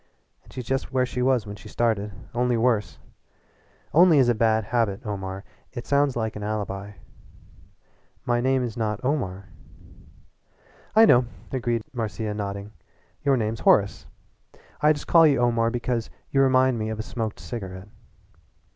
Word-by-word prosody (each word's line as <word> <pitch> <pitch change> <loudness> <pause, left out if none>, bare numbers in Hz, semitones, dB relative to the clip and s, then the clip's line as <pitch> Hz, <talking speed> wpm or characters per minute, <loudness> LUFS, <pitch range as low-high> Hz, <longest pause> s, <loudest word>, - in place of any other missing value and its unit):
And - - -19
she's 125 - -6
just 135 +2 -2
where 130 -1 +2
she 125 0 -4
was 125 -3 +2
when 105 0 -7
she 105 +2 -12
started 105 -3 0 0.2
only 120 0 +1
worse. 115 -3 +1 1.0
'Only' 170 0 +6
is 130 -3 +4
a - - +4
bad 110 -1 +2
habit, 115 -1 -1
Omar 95 -2 -5 0.3
it 120 -1 -6
sounds 140 -1 +2
like 110 -1 -2
an 105 - -6
alibi." 105 -1 -4 1.3
"My 120 0 +1
name 130 0 +2
is 120 -3 -4
not 110 -2 -2
Omar." 100 -9 -2 1.5
"I 220 +1 +8
know," 125 - +5 0.3
agreed 120 -3 -1
Marcia, 110 -2 -3
nodding 100 0 -5 0.5
"your 140 -1 +3
name's 110 -1 -2
Horace. 100 -1 +2 0.7
I 150 +1 +5
just 145 -2 -2
call 165 -2 +6
you 140 -4 +2
Omar 115 -1 +2
because 120 -1 -2 0.2
you 135 - +3
remind 130 -2 +3
me 110 0 -2
of 110 - -4
a 110 - -4
smoked 110 -2 -4
cigarette." 95 -4 -7
115 Hz, 155 wpm, -25 LUFS, 105-130 Hz, 1.5 s, I